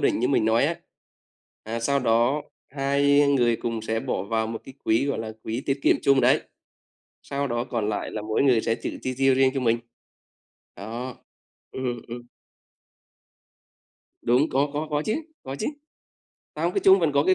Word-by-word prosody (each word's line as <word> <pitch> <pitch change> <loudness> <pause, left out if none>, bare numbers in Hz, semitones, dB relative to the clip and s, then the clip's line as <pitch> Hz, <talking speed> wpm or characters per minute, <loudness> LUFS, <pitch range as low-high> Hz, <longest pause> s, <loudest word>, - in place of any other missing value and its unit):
định - - +2
như 125 +3 +1
mình 130 -5 +2
nói 110 +3 +3
á. 170 - 0 0.9
À, 115 +2 -4
sau 140 +4 +1
đó 120 +4 +2 0.3
hai 140 +1 +3
người 120 -4 +3
cùng 115 -1 -3
sẽ 110 0 -1
bỏ 95 - -2
vào 110 +3 -1
một 115 0 -5
cái 135 - -11
quỹ 115 +5 +2
gọi 140 - -1
là 110 -1 -4
quỹ 115 +3 -3
tiết 135 0 0
kiệm - - +4
chung 140 -1 +4
đấy, - - +4 0.8
sau 140 0 -3
đó 120 -1 -1
còn 115 -4 -2
lại 105 - -3
là 110 - -4
mỗi 110 +4 0
người 125 -5 +4
sẽ 115 - 0
tự - - -5
chi 130 - -2
tiêu 135 0 +4
riêng 130 0 +4
cho 135 - -1
mình. 115 -2 +2 1.0
Đó, 120 +5 -6 0.6
ừm, 125 -2 -3
ừm. 120 +1 -6 2.0
Đúng, 125 +6 +3
có 140 +2 +2
có 150 +2 -2
có 150 0 0
chứ, 215 - 0 0.3
có 135 +1 -6
chứ. - - -2 0.9
Không, 170 +3 0
cái - - 0
chung 190 0 +7
vẫn 160 -4 +2
có 140 +1 +3
cái 185 - +4
130 Hz, 185 wpm, -25 LUFS, 115-140 Hz, 2.0 s, chung